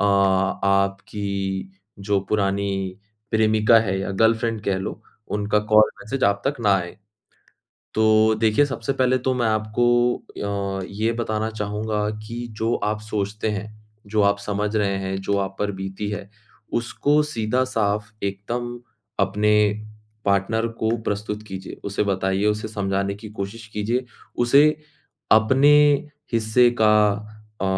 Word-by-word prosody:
अ, - - +2
आपकी 100 0 0 0.3
जो 100 0 0
पुरानी 100 -2 -1 0.3
प्रेमिका 110 +1 +4
है 95 -3 -1
या 95 - -3
गर्लफ्रेंड 115 +2 +1
कह 100 - +1
लो, 95 - -6 0.3
उनका 105 0 0
कॉल, 105 +1 +5 0.2
मैसेज 130 +5 -2
आप 100 0 +2
तक 145 - +1
ना 100 -3 +4
आए। 90 -2 -5 1.0
तो 110 0 +4
देखिए, 110 +5 +4
सबसे 130 -1 -3
पहले 130 -1 +2
तो 130 +1 0
मैं 120 -2 0
आपको 120 +3 +2 0.7
अ, - - -5
ये 110 +3 0
बताना 110 -1 -1
चाहूँगा 105 0 -2 0.2
कि 120 +2 -5
जो 115 +1 +1
आप 105 0 -1
सोचते 105 0 -3
हैं, 105 0 -4 0.4
जो 105 0 +1
आप 100 0 +3
समझ 105 +1 -2
रहे 100 -2 +1
हैं, 95 0 -3
जो 100 +1 0
आप 95 0 -3
पर 105 0 0
बीती 95 +2 -5
है, 100 -1 -5 0.4
उसको 145 +5 +1
सीधा-साफ 115 -4 -1
एकदम 120 +5 -3 0.4
अपने 105 +2 +2 0.7
पार्टनर 100 +3 +1
को 110 0 +1
प्रस्तुत 105 0 -3
कीजिए। 95 0 -7
उसे 100 0 -1
बताइए, 95 0 0
उसे 105 +1 0
समझाने 100 -1 -1
की 105 +2 -10
कोशिश 110 +2 -6
कीजिए, 115 +5 -1 0.3
उसे 140 +5 +6 0.6
अपने 130 +7 +5 0.6
हिस्से 115 +2 +4
का 105 -1 +6 0.7
अ, - - -1
105 Hz, 135 wpm, -23 LUFS, 100-115 Hz, 1.0 s, उसे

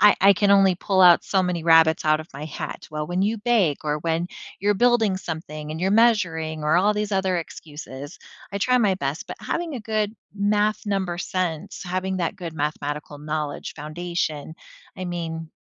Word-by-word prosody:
I 210 0 +7
I 200 +1 +8
can 200 +1 +2
only 195 -2 +6
pull 190 +1 +1
out 175 -1 +7
so 190 -2 +2
many 180 -2 -1
rabbits 160 0 +5
out 155 0 +4
of 155 - -11
my 140 +2 -7
hat: 155 - -6
"Well, 150 0 -3
when 175 +2 -1
you 215 +3 +1
bake 205 - +1
or 150 0 0
when 165 +2 -1 0.3
you're 205 +2 +2
building 225 -2 +3
something 155 -4 -6
and 160 +1 -5
you're 190 +2 +1
measuring," 175 -9 +2
or 155 +2 +3
all 205 +4 +3
these 210 0 -2
other 190 -1 +1
excuses, 145 -2 -8 0.3
I 200 - -2
try 250 +5 +3
my 205 -5 +3
best, 150 -3 -3
but - - -7
having 340 -3 -3
a 250 - -4
good 215 -1 -1 0.2
math 210 +1 +1
number 190 -4 -1
sense, 180 -3 -3
having 185 +1 -2
that 175 +2 -1
good 170 -4 -7
mathematical 150 -1 -3
knowledge 150 -1 -4
foundation, 160 -1 -4 0.4
I 185 - -5
mean, 165 -2 -4
175 Hz, 190 wpm, -24 LUFS, 155-200 Hz, 0.4 s, I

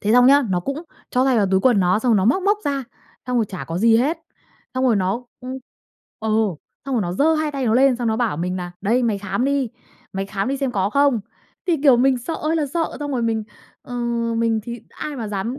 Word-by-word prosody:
thế 210 +1 +1
xong 245 +1 +6
nhá, 280 +2 +6
nó 180 -1 +1
cũng 275 - -4 0.3
cho 255 0 +2
tay 265 -2 +3
vào 205 -3 +3
túi 190 0 +3
quần 240 -4 +4
nó 185 +2 +3
xong 230 -1 +3
nó 190 - +2
móc 320 - +3
móc 410 +2 +2
ra, 275 -2 -1 0.4
xong 250 0 -1
rồi 230 - +3
chả 185 - -6
có 165 +2 -4
gì 225 +1 +5
hết. 295 +8 +1 0.6
Xong 255 - 0
rồi 235 -5 +4
nó, 195 +6 -1 0.2
ưm 255 +1 -6 0.6
ừ, 220 - -2 0.6
xong 270 - -1
rồi 230 - +1
nó 175 -2 -2
giơ 300 - +3
hai 310 -1 0
tay 275 -3 -2
nó 220 - +2
lên, 265 -1 +4
xong 240 -1 -1
nó 220 - +1
bảo 230 -9 0
mình 180 +3 -2
nà 175 -1 -5
"Đây, 230 +6 +2
mày 220 -4 +1
khám 205 +5 -2
đi, 275 -2 +1 0.4
mày 195 0 -3
khám 195 +3 -2
đi 275 - 0
xem 270 -2 -2
có 195 -1 0
không." 280 -3 +3 0.5
Thì, 345 -3 +2
kiểu, 275 -5 +7
mình 260 +1 +3
sợ 285 +7 -4
ơi 320 +1 -1
là 300 - 0
sợ, 325 +4 -2
xong 290 -1 -3
rồi 250 -3 0
mình, 225 -1 0 0.4
ờ, 245 - -8 0.4
mình 225 -1 +1
thì 235 +2 -7
ai 300 -2 -6
mà 225 -4 -4
dám 210 +6 -3
245 Hz, 255 wpm, -21 LUFS, 210-275 Hz, 0.6 s, kiểu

